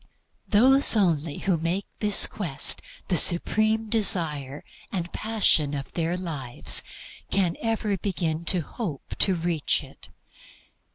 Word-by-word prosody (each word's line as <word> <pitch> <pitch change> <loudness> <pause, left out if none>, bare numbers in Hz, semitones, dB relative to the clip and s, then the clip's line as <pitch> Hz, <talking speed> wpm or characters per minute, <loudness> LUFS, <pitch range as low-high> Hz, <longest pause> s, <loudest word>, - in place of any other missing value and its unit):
Those 260 +5 +4
only 165 -7 0
who 190 -3 -1
make 170 +5 -3
this 210 -2 +5
quest 155 -9 -1 0.3
the 180 - +1
supreme 215 +6 +2
desire 160 - +2 0.3
and 175 -2 -5
passion 190 -10 +1
of 140 -1 -7
their 170 +1 -2
lives 145 -9 +1 0.5
can 185 -4 0
ever 220 -3 -1
begin 170 -5 -3
to 180 0 +2
hope 160 - -7
to 190 - +3
reach 165 -3 -1
it. - - -15
175 Hz, 120 wpm, -25 LUFS, 160-210 Hz, 0.5 s, this